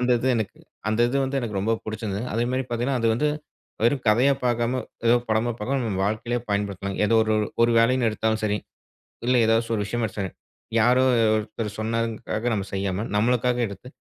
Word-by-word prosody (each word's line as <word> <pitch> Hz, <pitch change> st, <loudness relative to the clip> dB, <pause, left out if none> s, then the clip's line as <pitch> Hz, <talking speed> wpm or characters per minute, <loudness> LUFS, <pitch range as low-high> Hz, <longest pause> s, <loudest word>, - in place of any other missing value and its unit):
அந்த 125 Hz, 0 st, +1 dB
இது 130 Hz, -, 0 dB
எனக்கு 110 Hz, -3 st, -3 dB, 0.3 s
அந்த 110 Hz, +2 st, 0 dB
இது 130 Hz, -, -1 dB
வந்து 135 Hz, +1 st, -1 dB
எனக்கு 110 Hz, -5 st, -3 dB
ரொம்ப 110 Hz, +3 st, +1 dB
புடிச்சருந்தது. 110 Hz, 0 st, -3 dB
அதேமாரி 125 Hz, +3 st, 0 dB
பாத்தீங்கன்னா 120 Hz, +3 st, 0 dB
அது 115 Hz, -, +2 dB
வந்து 150 Hz, +6 st, +1 dB, 0.6 s
வெறும் 130 Hz, +2 st, +2 dB
கதையா 125 Hz, +6 st, +4 dB
பாக்காம, 120 Hz, +1 st, 0 dB, 0.2 s
ஏதோ 120 Hz, -, +6 dB
படமா 110 Hz, +2 st, +1 dB
பாக்காம, 135 Hz, +5 st, -1 dB
நம்ம 95 Hz, -3 st, -2 dB
வாழ்க்கையிலயே 115 Hz, +3 st, -2 dB
பயன்படுத்தலாம். 100 Hz, -1 st, -2 dB
ஏதோ 115 Hz, -, +2 dB
ஒரு 110 Hz, 0 st, +1 dB, 0.3 s
ஒரு 120 Hz, -, +2 dB
வேலைன்னு 120 Hz, 0 st, +3 dB
எடுத்தாலும் 110 Hz, 0 st, -1 dB
சரி, 105 Hz, 0 st, +1 dB, 0.7 s
இல்ல 125 Hz, -, +4 dB
ஏதாச்சு 115 Hz, +1 st, +2 dB
ஒரு 105 Hz, -, 0 dB
விஷயமோ 120 Hz, +3 st, -1 dB
எடுத்தாலும் 105 Hz, -, -9 dB
சரி, 95 Hz, -3 st, -3 dB, 0.5 s
யாரோ 125 Hz, +3 st, +4 dB, 0.3 s
ஒருத்தர் 105 Hz, -1 st, -5 dB
சொன்னதுங்க்காக 115 Hz, 0 st, -2 dB
நம்ம 100 Hz, -1 st, -3 dB
செய்யாம, 95 Hz, +1 st, -1 dB
நம்மளுக்காக 125 Hz, +2 st, +2 dB
எடுத்து 100 Hz, +5 st, -10 dB
115 Hz, 175 wpm, -24 LUFS, 105-120 Hz, 0.7 s, ஏதோ